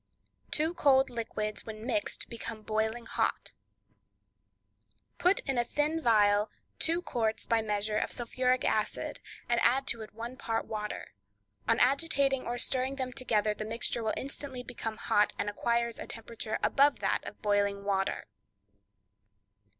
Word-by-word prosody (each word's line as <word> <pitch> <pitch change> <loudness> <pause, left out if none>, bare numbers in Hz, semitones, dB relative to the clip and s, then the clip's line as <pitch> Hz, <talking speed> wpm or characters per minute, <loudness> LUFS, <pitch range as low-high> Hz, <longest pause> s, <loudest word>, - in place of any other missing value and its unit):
Two 315 +3 +1
Cold 270 -6 +4
Liquids 215 -2 -2
When 220 0 -7
Mixed 310 +4 -1
Become 230 -2 -6
Boiling 220 +2 -1
Hot.—Put 360 - -4
in 270 -4 0
a - - +4
thin 300 +6 0
phial 210 -2 +4 0.3
two 335 +2 +2
quarts 225 -6 -1
(by 230 -1 +2
measure) 210 0 0
of - - -2
sulphuric 255 +1 0
acid, 215 -1 -1 0.3
and 240 -1 +2
add 265 +3 +3
to 230 -4 -1
it 215 -1 -10
one 235 +3 -6
part 225 -1 -1
of - - -20
water; 210 -1 -4 0.5
on 230 - +3
agitating 275 0 +2
or 240 +1 -1
stirring 260 +2 0
them 260 -2 -3
together 215 -4 +1
the 215 - -5
mixture 225 0 -1
instantly 270 -1 -4
becomes 225 -2 -5
hot, 210 0 +3
and 205 - -1
acquires 235 +2 0
a - - -6
temperature 225 -1 -4
above 285 +1 +4
that - - +1
of - - -9
boiling 200 -1 +2
water. 195 -1 0
235 Hz, 140 wpm, -31 LUFS, 215-260 Hz, 0.5 s, Cold